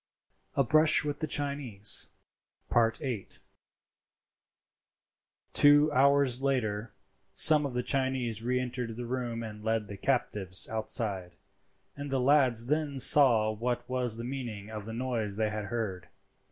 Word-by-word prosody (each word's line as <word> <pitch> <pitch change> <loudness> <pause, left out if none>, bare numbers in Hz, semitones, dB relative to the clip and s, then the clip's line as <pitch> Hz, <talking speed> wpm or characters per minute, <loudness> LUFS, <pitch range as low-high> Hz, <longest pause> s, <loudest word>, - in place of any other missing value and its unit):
A 140 - +3
BRUSH 155 +4 +4
WITH 145 -1 -4
THE 155 - -3
CHINESE.—VIII. 120 -2 -2 2.3
Two 145 +1 +5
hours 140 -2 +2
later 115 -5 -2 0.4
some 150 -2 +6
of 130 - -8
the 125 - -1
Chinese 130 -4 -2
re 125 +2 -1
entered 125 -2 -5
the 120 +1 -6
room 120 -2 -4
and 105 -1 -9
led 110 -1 -2
the 100 - -8
captives 100 -7 0
outside, 105 -5 -1 0.6
and 145 0 -7
the 135 -1 -1
lads 130 -3 +3
then 150 0 -2
saw 125 -6 +5
what 120 +3 -4
was 125 -3 0
the 115 - -6
meaning 120 -5 -7
of 105 -2 -7
the 110 - -7
noise 115 -4 -3
they 110 0 -1
had 105 -1 -5
heard. 100 -5 -5
120 Hz, 130 wpm, -29 LUFS, 110-135 Hz, 2.3 s, some